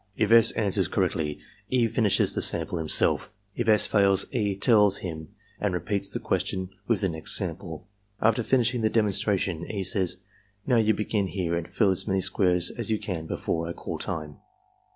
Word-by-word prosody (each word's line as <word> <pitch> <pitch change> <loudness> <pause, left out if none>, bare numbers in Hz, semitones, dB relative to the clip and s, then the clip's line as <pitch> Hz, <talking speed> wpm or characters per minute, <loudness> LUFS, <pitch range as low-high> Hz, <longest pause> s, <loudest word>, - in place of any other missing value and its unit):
If 110 0 +1
S. 115 0 +7
answers 100 -5 0
correctly, 80 -5 -1 0.3
E. 125 -3 +2
finishes 110 -3 +1
the - - -2
samples 85 - +1
himself; 80 -1 +1 0.2
if 120 -1 -1
S. 105 -1 +6
fails, 100 -2 +3
E. 105 -5 0
tells 105 -1 +4
him 80 -3 -6 0.3
and 100 -4 -1
repeats 100 +2 -2
the - - -5
question 95 0 -2 0.2
with 115 -3 +1
the 95 - +1
next 80 -1 -1
sample. 85 -3 -6 0.3
After 115 +2 +2
finishing 120 0 +1
the 110 - +2
demonstration, 100 -5 0
E. 100 -3 -3
says: 95 -2 0 0.5
''Now, 125 -3 +3
you 110 0 +2
begin 105 -2 -1
here 90 -3 -3
arid 85 0 -3
fill 100 -4 +2
as 95 - -3
many 95 -1 +1
squares 90 -2 +1
as 115 -3 -6
you 110 - +1
can 85 -6 -5
before 80 0 -3
I - - -4
caU - - -6
time.'' 75 -4 -5
100 Hz, 180 wpm, -26 LUFS, 90-110 Hz, 0.5 s, S